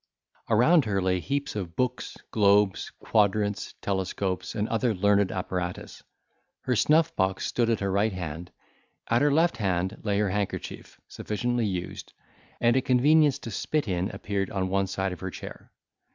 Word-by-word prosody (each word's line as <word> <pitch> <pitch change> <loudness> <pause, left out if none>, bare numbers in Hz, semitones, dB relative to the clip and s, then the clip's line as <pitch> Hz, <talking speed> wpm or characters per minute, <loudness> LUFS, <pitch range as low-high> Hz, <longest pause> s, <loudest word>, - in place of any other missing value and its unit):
Around 130 +8 +5
her 100 -2 0
lay 95 -1 +1
heaps 140 +7 -3
of 90 -5 -5
books, 125 +2 -2
globes, 100 -2 +3
quadrants, 105 -1 0
telescopes, 95 -1 -2
and 105 0 -1
other 115 -1 0
learned 100 0 +3
apparatus; 90 -1 -4 0.6
her 125 - 0
snuff 155 +7 +3
box 95 0 0
stood 120 -2 0
at 115 -3 0
her 100 -1 0
right 100 +3 +2
hand: 85 -2 -6 0.6
at 115 - +4
her 145 0 +4
left 160 -2 +2
hand 95 -3 -1
lay 100 -2 0
her 105 -2 +1
handkerchief, 105 0 -4
sufficiently 120 +1 -2
used, 90 -2 -5 0.5
and 120 0 +3
a 130 - +3
convenience 145 +3 +4
to 115 - -8
spit 150 +8 -1
in 90 0 -1
appeared 100 0 -3
on 95 -1 -2
one 95 0 +1
side 95 0 -2
of 90 - -9
her 95 - -4
chair. - - -10
100 Hz, 160 wpm, -27 LUFS, 95-120 Hz, 0.6 s, Around